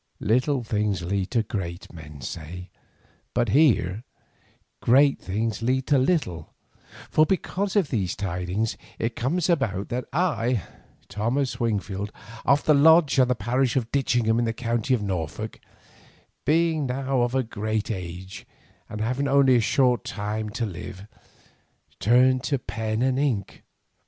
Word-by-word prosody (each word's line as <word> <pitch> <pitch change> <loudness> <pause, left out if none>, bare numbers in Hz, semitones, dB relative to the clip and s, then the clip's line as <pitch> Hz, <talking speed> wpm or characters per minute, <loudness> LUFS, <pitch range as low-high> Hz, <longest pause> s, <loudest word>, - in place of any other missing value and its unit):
Little 125 +4 +1
things 105 -4 -1
lead 95 +2 -1
to 115 -3 +1
great, 90 -5 -5
men 75 -4 -11
say, 85 +6 -7 0.6
but 120 -2 +2
here 110 - +3 0.8
great 140 +3 +4
things 110 +3 -2
lead 130 +3 0
to 145 -3 +3
little, 130 - -1 0.6
for 155 - +5
because 190 +3 -1
of 190 -8 +2
these 95 -8 -1
tidings 95 +3 -2 0.2
it 115 +1 -2
comes 160 +8 0
about 115 - 0
that 125 +1 -3
I, 130 - 0 0.4
Thomas 125 +6 -1
Wingfield, 105 -3 -2 0.3
of 140 +2 +3
the 155 - +4
Lodge 155 0 +5
and 125 -1 +4
the 125 - +2
parish 120 +3 0
of 120 -3 -1
Ditchingham 120 -4 +2
in 120 - +1
the 115 - -1
county 120 +2 0
of 110 - -4
Norfolk, 90 -6 -4 0.9
being 160 0 +2
now 130 0 -1
of 120 +1 0
a 130 - +2
great 110 -1 -3
age 90 -1 -7 0.4
and 105 - -5
having 130 +5 0
only 135 -1 +5
a 120 - +4
short 125 -2 +2
time 105 +1 -4
to 115 +2 -2
live, 95 0 -8 0.9
turn 125 +4 +4
to 135 +2 -1
pen 110 -1 -3
and 130 0 +1
ink. 125 -9 -1
115 Hz, 145 wpm, -25 LUFS, 100-135 Hz, 0.9 s, for